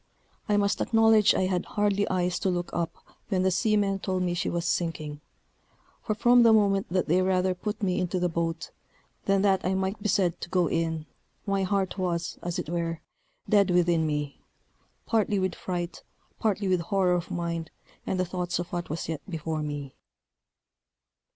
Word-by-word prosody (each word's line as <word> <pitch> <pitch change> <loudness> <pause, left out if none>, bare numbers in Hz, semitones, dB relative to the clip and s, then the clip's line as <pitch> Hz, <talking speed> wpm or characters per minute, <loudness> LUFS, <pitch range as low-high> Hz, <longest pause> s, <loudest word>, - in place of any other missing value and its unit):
I 205 - +3
must 200 -1 +1
acknowledge 225 -2 +5
I - - +2
had 185 -1 0
hardly 205 -1 0
eyes 180 -1 0
to 195 - 0
look 175 -1 -2
up 170 -1 -2 0.3
when 185 -3 +1
the 190 - +3
seamen 200 -1 +1
told 185 -1 -1
me 175 -1 0
she 175 - -1
was 170 0 -2
sinking; 155 -4 -2 0.8
for 215 - -2
from 240 +2 +5
the 230 -1 +7
moment 200 -3 +3
that 185 -1 0
they 175 +4 +3
rather 185 0 +2
put 210 +4 -5
me 185 -1 +1
into 180 0 -1
the 180 - +2
boat, 165 0 -3 0.5
than 195 0 +2
that 195 -2 +3
I 190 +1 +1
might 190 +2 -2
be 210 - -1
said 180 -3 +1
to - - -6
go 180 -1 +2
in, 160 -1 -1 0.4
my 195 -1 0
heart 195 0 -1
was, 175 -2 -2
as 175 -1 -3
it - - -3
were, 165 0 -2 0.5
dead 200 -2 +4
within 175 -2 +3
me, 150 -2 -3 0.6
partly 215 -2 +1
with 185 -2 0
fright, 175 -1 -4 0.4
partly 205 -2 0
with 185 -2 +2
horror 185 0 +1
of 175 -1 -1
mind, 170 -2 -3 0.3
and 185 - -2
the 185 - +2
thoughts 180 0 -2
of 175 0 -5
what 175 0 -3
was 155 +2 -4
yet 160 -2 -3
before 160 -2 -3
me. 145 -2 -5
180 Hz, 185 wpm, -27 LUFS, 170-195 Hz, 0.8 s, the